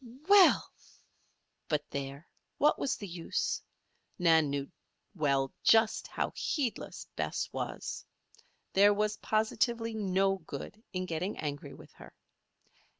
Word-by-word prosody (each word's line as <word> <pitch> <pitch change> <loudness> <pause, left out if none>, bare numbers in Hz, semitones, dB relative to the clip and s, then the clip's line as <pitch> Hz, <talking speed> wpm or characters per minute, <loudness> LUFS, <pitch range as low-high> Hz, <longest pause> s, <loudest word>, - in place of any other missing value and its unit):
"Well!" 400 -2 +6 1.0
But 150 -2 +1
there! 140 +2 -5 0.3
What 295 - +3
was 275 - 0
the 205 - -7
use? 170 -2 -2 0.6
Nan 160 -4 +4
knew 140 0 -3 0.4
well 140 -6 +1
just 225 -1 +4
how - - -2
heedless 270 -8 -2
Bess - - -2
was. - - -4 0.7
There 205 +1 +6
was 210 +1 0
positively 225 +1 0
no 195 -2 +1
good 190 +4 -8
in 185 -1 -2
getting 180 +4 -3
angry 145 -2 -5
with - - -14
her. - - -14
190 Hz, 115 wpm, -31 LUFS, 155-220 Hz, 1.0 s, Well